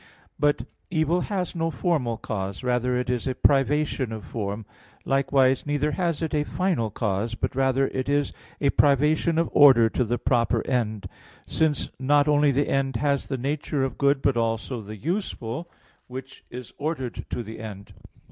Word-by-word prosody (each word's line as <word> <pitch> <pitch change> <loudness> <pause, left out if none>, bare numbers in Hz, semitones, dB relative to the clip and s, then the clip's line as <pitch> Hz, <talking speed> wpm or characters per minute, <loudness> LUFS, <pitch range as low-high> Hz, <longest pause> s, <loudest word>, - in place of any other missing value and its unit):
But 145 0 +2 0.3
evil 170 +1 +1
has 185 -3 -2
no 165 -2 -1
formal 135 -6 0
cause, 100 -2 -4
rather 125 0 +1
is 125 0 -2
it - - +1
a - - -6
privation 140 -2 +2
of 110 -2 -6
form; 105 -1 -4 0.4
likewise, 135 -1 +2
neither 145 +1 0
has 170 0 -1
it 160 - -2
a 150 -1 +2
final 170 - -1
cause, 105 +1 -2
but - - -3
rather 135 0 +2
is 140 +2 0
it - - -19 0.3
a - - +5
privation 150 +4 +3
of 165 - +1
order 130 -6 +7
to 125 - 0
the 120 +1 -1
proper 120 -2 +1
end; 110 -5 -1 0.4
since 155 -3 0
not 145 +2 +3
only 150 0 +4
the 140 +1 +1
end 135 -1 0
has 140 +2 0
the 135 - -2
nature 140 +1 -1
of 135 - -3
good, 140 -1 +2
but 135 - +3
also 115 +1 -1
the 105 +1 -9
useful, 165 - -3 0.4
which 130 +1 -9
is 125 -1 -9
ordered 145 -5 -3
to 120 - -3
the 110 +1 -9
end. 105 -3 -8
135 Hz, 170 wpm, -25 LUFS, 115-150 Hz, 0.4 s, order